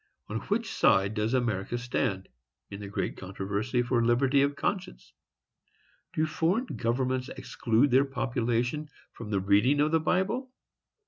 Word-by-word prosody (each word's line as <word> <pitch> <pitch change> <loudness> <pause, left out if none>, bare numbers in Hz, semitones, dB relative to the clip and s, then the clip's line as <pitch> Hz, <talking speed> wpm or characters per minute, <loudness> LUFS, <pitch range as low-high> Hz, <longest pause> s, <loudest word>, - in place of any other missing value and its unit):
On - - -2
which - - -1
side 100 +2 +3
does 110 +3 0
America 115 -2 -1
stand, 120 -5 -2 0.4
in 100 - -6
the 100 - -7
great 100 - -3
controversy 100 +6 -2
for 120 -1 +1
liberty 130 +4 +3
of 140 +1 +1
conscience? 180 - -4 1.0
Do 155 - +1
foreign 170 +9 0
governments 130 - -1
exclude 120 +3 0
their 135 +3 +5
population 125 +2 -1 0.2
from 115 -3 -8
the 100 -2 +1
reading 105 +9 +3
of 150 +1 +3
the 165 - +4
Bible? 190 - 0
125 Hz, 140 wpm, -28 LUFS, 110-145 Hz, 1.0 s, their